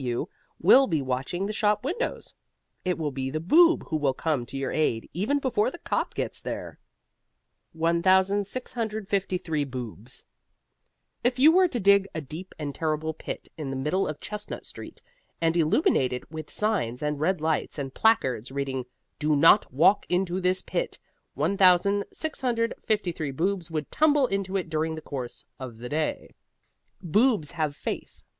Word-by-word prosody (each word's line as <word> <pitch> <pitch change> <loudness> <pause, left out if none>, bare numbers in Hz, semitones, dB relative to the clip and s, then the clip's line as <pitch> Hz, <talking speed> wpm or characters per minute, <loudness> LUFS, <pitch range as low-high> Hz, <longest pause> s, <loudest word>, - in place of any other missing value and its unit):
W.W. 120 -2 -1 0.3
will 260 +10 +6
be 160 -4 +1
watching 135 +8 -2
the 210 - -3
shop 210 +1 +1
windows. 460 - -3 0.5
It 180 -1 0
will 155 -3 -2
be 130 -1 -3
the 155 +3 -2
Boob 330 - +5
who 155 - 0
will 140 -3 +1
come 145 -7 -1
to 135 - -6
your 135 -1 -2
aid, 120 -8 0
even 215 - +1
before 350 - +1
the - - -9
cop - - -2
gets - - -3
there. - - -6 0.9
1653 190 - 0
BOOBS 125 - -6 1.0
If 245 +1 +2
you 290 +5 +7
were 370 +2 +5
to 255 -8 -3
dig 200 -1 +5
a - - -1
deep 160 +6 -9
and 145 -2 -4
terrible 160 0 -1
pit - - -7
in 145 -3 -4
the 135 - -3
middle 150 +9 0
of 150 -1 -5
Chestnut 210 0 -7
Street, - - -10 0.4
and 165 0 +1
illuminate 155 - +3
it 125 - -7
with 155 -1 -7
signs 170 - -1
and 150 -1 -1
red 180 +3 +1
lights 160 0 -1
and 135 -2 -4
placards 130 - +2
reading, 135 -2 -3 0.3
DO 150 0 +2
NOT 165 +8 +5
WALK 165 +10 +4
INTO 180 0 0
THIS 185 +1 +1
PIT, - - -3 0.4
1653 200 - +1
Boobs 175 +5 -1
would 155 -3 -4
tumble 295 -3 +4
into 195 -3 -1
it 185 - -3
during 160 +1 -1
the 155 - -7
course 130 -6 -6
of 125 -4 -7
the 120 +2 -7
day. 155 +2 -2 0.7
Boobs 205 - +2
have 155 -4 -2
faith. - - -6
165 Hz, 155 wpm, -26 LUFS, 145-205 Hz, 1.0 s, you